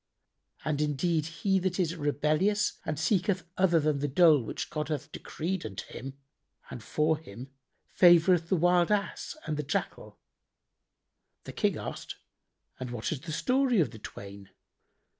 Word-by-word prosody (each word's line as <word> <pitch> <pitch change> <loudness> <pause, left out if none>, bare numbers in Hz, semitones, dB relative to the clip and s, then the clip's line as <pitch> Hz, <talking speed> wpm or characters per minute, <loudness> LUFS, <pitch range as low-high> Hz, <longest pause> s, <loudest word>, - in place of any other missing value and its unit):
And 150 -1 0
indeed 150 +2 0
he 190 +4 0
that 185 0 -2
is 170 -2 0
rebellious 155 +7 +1
and 155 - -2
seeketh 185 +3 +1
other 175 -3 +3
than 150 -2 0
the 145 - -1
dole 155 0 +5
which 110 - -5
God 150 -1 -3
hath 150 -4 -4
decreed 180 +3 -4
unto 95 -3 -6
him 135 +2 -7 0.5
and 120 - -7
for 155 +6 0
him, 125 -1 -11 0.4
favoureth 175 -1 +6
the - - +3
wild 175 +2 +3
Ass 205 +8 -2
and 155 -1 -2
the - - 0 0.2
Jackal.''[FN#79] - - -8 1.3
The - - -9
King - - 0
asked, - - -6 0.6
"And 130 -1 -5
what 120 -2 -3
is 155 - -2
the 165 +1 -7
story 255 - +2
of 160 - +2
the 110 - -11
twain?" 100 -1 -10
160 Hz, 155 wpm, -29 LUFS, 145-180 Hz, 1.3 s, favoureth